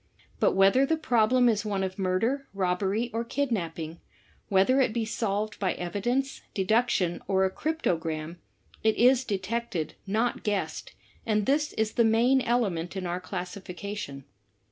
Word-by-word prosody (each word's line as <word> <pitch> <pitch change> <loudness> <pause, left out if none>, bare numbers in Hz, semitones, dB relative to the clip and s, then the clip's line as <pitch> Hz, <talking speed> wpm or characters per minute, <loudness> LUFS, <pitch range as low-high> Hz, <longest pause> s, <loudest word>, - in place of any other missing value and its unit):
But - - +3
whether 195 +7 +5
the 320 +4 +1
problem 245 -4 +3
is 220 -3 +2
one 200 -3 -1
of 185 +1 -4
murder, 225 +9 0
robbery 195 +5 0
or 230 +1 -1
kidnapping, 175 - -3 0.2
— - - -34
whether 200 +8 +4
it 245 -4 +1
be 230 -1 -1
solved 215 -1 -2
by 190 -3 +1
evidence, 240 +10 -2
deduction 195 -3 +1
or 190 0 +3
a 190 - 0
|crTOtopranij 165 - -2 0.5
it 220 0 +3
is 255 +1 +5
detected, 205 -5 -3
not 225 +5 0
guessed, 205 -2 -3 0.3
and 215 -2 +1
this 295 +2 +1
is 220 0 0
the 235 - +3
main 235 +4 +4
element 200 -9 0
in 190 -1 -3
our 175 +1 -2
classification. 180 -4 -6
210 Hz, 145 wpm, -27 LUFS, 185-240 Hz, 0.5 s, whether